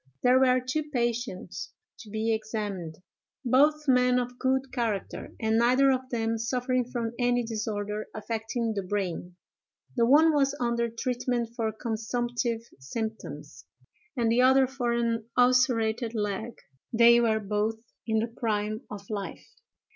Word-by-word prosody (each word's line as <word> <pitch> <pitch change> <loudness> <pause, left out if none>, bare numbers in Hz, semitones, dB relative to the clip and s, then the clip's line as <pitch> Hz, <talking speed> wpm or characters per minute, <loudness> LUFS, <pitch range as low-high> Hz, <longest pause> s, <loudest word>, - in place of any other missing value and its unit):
"There 250 +1 +5
were 255 -1 +4
two 295 +5 -3
patients 240 -6 -3 0.3
to 220 - -11
be 220 +2 0
examined—both 220 - -1
men 250 -1 +4
of 245 0 -3
good 265 0 0
character, 230 -6 -3
and 220 0 +2
neither 255 +3 +4
of 260 0 -2
them 225 -2 -1
suffering 250 +2 0
from 235 -2 -3
any 245 0 +2
disorder 215 -2 -3
affecting 225 +1 -2
the 200 - -2
brain; 180 -2 -3 0.6
the 235 -2 +3
one 310 +5 +6
was 285 -1 +2
under 235 -1 0
treatment 240 0 -2
for 225 -3 -1
consumptive 235 +1 -2 0.2
symptoms, 150 - -6 0.5
and 230 -2 +2
the 240 +2 +4
other 265 +1 +6
for 255 -2 -2
an 230 -1 -1
ulcerated 245 -2 +3
leg: 210 0 -1 0.5
and 225 - -3
they 235 0 +8
were 220 -2 +2
both 210 +2 -1 0.3
in 220 -1 +1
the 230 - -1
prime 215 -1 -2
of 200 -1 -8
life. 200 -2 -5
235 Hz, 140 wpm, -28 LUFS, 220-250 Hz, 0.6 s, they